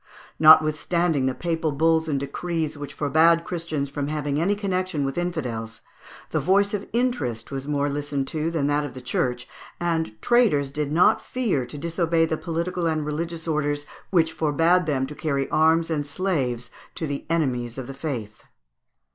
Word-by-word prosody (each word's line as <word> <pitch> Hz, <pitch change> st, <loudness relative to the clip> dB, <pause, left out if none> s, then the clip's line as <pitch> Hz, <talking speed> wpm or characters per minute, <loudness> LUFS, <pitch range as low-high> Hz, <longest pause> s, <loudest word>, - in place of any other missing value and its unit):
Notwithstanding 155 Hz, -1 st, +5 dB
the 130 Hz, -, -1 dB
papal 165 Hz, -2 st, -1 dB
bulls 160 Hz, +2 st, +2 dB
and 145 Hz, -3 st, 0 dB
decrees, 155 Hz, +2 st, -3 dB
which 145 Hz, -1 st, -7 dB
forbade 160 Hz, +3 st, +4 dB
Christians 165 Hz, -5 st, -3 dB
from 140 Hz, 0 st, -3 dB
having 150 Hz, -1 st, -1 dB
any 200 Hz, +4 st, +2 dB
connection 185 Hz, -7 st, -1 dB
with 135 Hz, -, -3 dB
infidels, 125 Hz, -11 st, -3 dB, 0.5 s
the -, -, +1 dB
voice 200 Hz, +2 st, +2 dB
of 205 Hz, -1 st, -3 dB
interest 210 Hz, -, -1 dB
was 135 Hz, 0 st, -4 dB
more 145 Hz, -1 st, 0 dB
listened 145 Hz, -1 st, -2 dB
to 155 Hz, +1 st, -1 dB
than 160 Hz, -4 st, -1 dB
that 145 Hz, +1 st, +1 dB
of 140 Hz, -3 st, -6 dB
the -, -, -6 dB
Church 125 Hz, 0 st, -1 dB
(Fig. -, -, -23 dB, 0.3 s
192), 165 Hz, -2 st, 0 dB
and 110 Hz, -, -36 dB
traders 195 Hz, -, +3 dB
did 145 Hz, 0 st, -2 dB
not 165 Hz, +4 st, +4 dB
fear 210 Hz, -, -1 dB
to 135 Hz, -, -8 dB
disobey 165 Hz, +1 st, +1 dB
the 160 Hz, -, -1 dB
political 170 Hz, +2 st, -2 dB
and 155 Hz, -2 st, 0 dB
religions 165 Hz, +2 st, -4 dB
orders 145 Hz, -2 st, -1 dB, 0.2 s
which 165 Hz, -4 st, +2 dB
forbade 165 Hz, +3 st, +2 dB
them 135 Hz, -3 st, +1 dB
to 145 Hz, -, -8 dB
carry 140 Hz, -3 st, -1 dB
arms 160 Hz, +1 st, +3 dB
and 145 Hz, -2 st, -1 dB
slaves 135 Hz, -8 st, -2 dB, 0.2 s
to 160 Hz, -, -3 dB
the 140 Hz, -2 st, -4 dB
enemies 125 Hz, -8 st, -1 dB
of 130 Hz, -, -4 dB
the 135 Hz, -, -7 dB
faith. 125 Hz, -8 st, -5 dB
155 Hz, 175 wpm, -24 LUFS, 140-170 Hz, 0.5 s, Notwithstanding